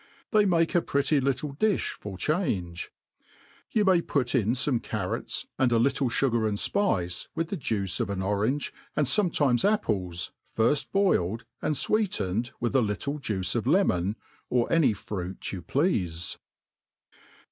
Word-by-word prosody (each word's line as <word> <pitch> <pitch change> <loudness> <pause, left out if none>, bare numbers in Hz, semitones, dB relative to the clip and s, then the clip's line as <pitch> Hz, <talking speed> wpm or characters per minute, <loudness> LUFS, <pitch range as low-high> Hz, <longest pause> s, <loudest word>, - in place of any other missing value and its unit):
They 215 -2 +5
make 165 -2 +2
a 175 - +4
pretty 140 0 +1
little 140 +2 -1
di(h 215 +2 +1
for 100 -3 -8
change. 95 - -1 0.8
You 210 -2 +2
may 185 -3 +5
put 130 -6 -1
in 115 -3 +2
fome 130 -2 0
carrots, 100 -4 -3
and 130 -2 +3
a 115 - +4
little 135 +2 +2
fugar 115 -3 +1
and 100 - -2
fpice, 95 - 0
with 165 0 -1
the - - -2
juice 105 - -2
of - - -1
In 100 -1 -2
orange, 105 +9 0 0.2
and 150 - +2
fometimes 140 - +2
apples, 95 - 0 0.3
firft 120 +6 +2
boiled 115 - +1 0.2
and 155 - 0
fweet<ined| 120 - 0
widi 120 +1 -1
a 135 - +5
little 125 +7 -2
juice 95 -8 -1
of 115 0 -1
lemon, 110 - +2 0.3
or 125 -1 +1
any 165 -9 +4
fruit 95 -2 -5
you 95 - -5
pleafe. 90 - 0
125 Hz, 150 wpm, -27 LUFS, 100-155 Hz, 0.8 s, They